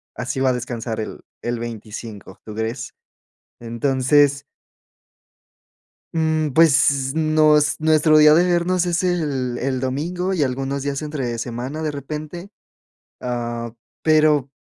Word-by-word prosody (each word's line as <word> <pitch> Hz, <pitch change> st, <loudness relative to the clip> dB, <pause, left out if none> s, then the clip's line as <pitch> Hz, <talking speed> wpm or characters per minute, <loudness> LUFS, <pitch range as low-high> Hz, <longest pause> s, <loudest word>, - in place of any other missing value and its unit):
así 125 Hz, +1 st, -4 dB
va 130 Hz, 0 st, +3 dB
a -, -, +2 dB
descansar 115 Hz, -2 st, -4 dB
el 110 Hz, -, -7 dB, 0.2 s
el 120 Hz, 0 st, -3 dB
25, 110 Hz, -3 st, -8 dB
¿tú 105 Hz, -, -8 dB
crees? 110 Hz, +3 st, -4 dB, 0.7 s
Entonces 135 Hz, +4 st, +2 dB, 1.7 s
mm, 160 Hz, -1 st, +1 dB
pues 140 Hz, -3 st, +4 dB
nos 155 Hz, -2 st, +3 dB
nuestro 155 Hz, 0 st, +4 dB
día 150 Hz, 0 st, +7 dB
de 175 Hz, +3 st, +4 dB
vernos 175 Hz, 0 st, +1 dB
es 175 Hz, 0 st, 0 dB
el 145 Hz, -9 st, -1 dB
el 130 Hz, 0 st, -2 dB
domingo 170 Hz, +9 st, -2 dB
y 165 Hz, -, 0 dB
algunos 135 Hz, +1 st, -2 dB
días 140 Hz, 0 st, -2 dB
entre 135 Hz, -6 st, -3 dB
semana 125 Hz, +6 st, -5 dB
de 155 Hz, -, -1 dB
repente. 150 Hz, +6 st, -7 dB, 0.7 s
Ah, 120 Hz, -1 st, -4 dB, 0.3 s
pero, 155 Hz, -3 st, +3 dB
140 Hz, 125 wpm, -21 LUFS, 125-155 Hz, 1.7 s, día